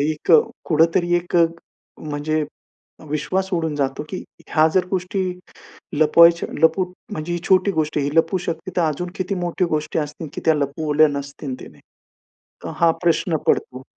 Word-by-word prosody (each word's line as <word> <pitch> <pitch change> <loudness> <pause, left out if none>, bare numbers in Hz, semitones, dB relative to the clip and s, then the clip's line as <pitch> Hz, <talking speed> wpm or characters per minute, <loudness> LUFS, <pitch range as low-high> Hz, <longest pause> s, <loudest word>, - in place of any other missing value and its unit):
एक 150 +1 0 0.3
कुठेतरी 170 +2 +2
एक, 175 0 -2 0.6
म्हणजे 155 +1 -2 0.7
विश्वास 155 +6 -1
उडून 160 -3 -1
जातो 140 0 -2
की 185 - -5 0.2
ह्या 155 -1 +4
जर 185 -1 +3
गोष्टी 190 +1 -1 0.7
लपवायच्या 170 +3 +5
लपू 160 +3 +4 0.3
म्हणजे 165 -2 -4
ही 175 - -2
छोटी 190 +1 +4
गोष्ट 155 -4 -1
आहे. 145 - +1
ही 145 - -4
लपू 175 +4 +3
शकते, 170 +3 -4
तर 175 - +4
अजून 165 +4 -3
किती 185 +1 -2
मोठी 175 +2 0
गोष्टी 155 +1 -2
असतील, 150 +1 -5
की - - -6
त्या 160 - +5
लपवल्या 150 +1 +2
नसतील 140 -1 -5
तिने? - - -13 0.9
तर - - -4
हा 170 -1 +4
प्रश्न 170 0 +2
पडतो. 130 +1 0
160 Hz, 155 wpm, -21 LUFS, 150-175 Hz, 0.9 s, लपवायच्या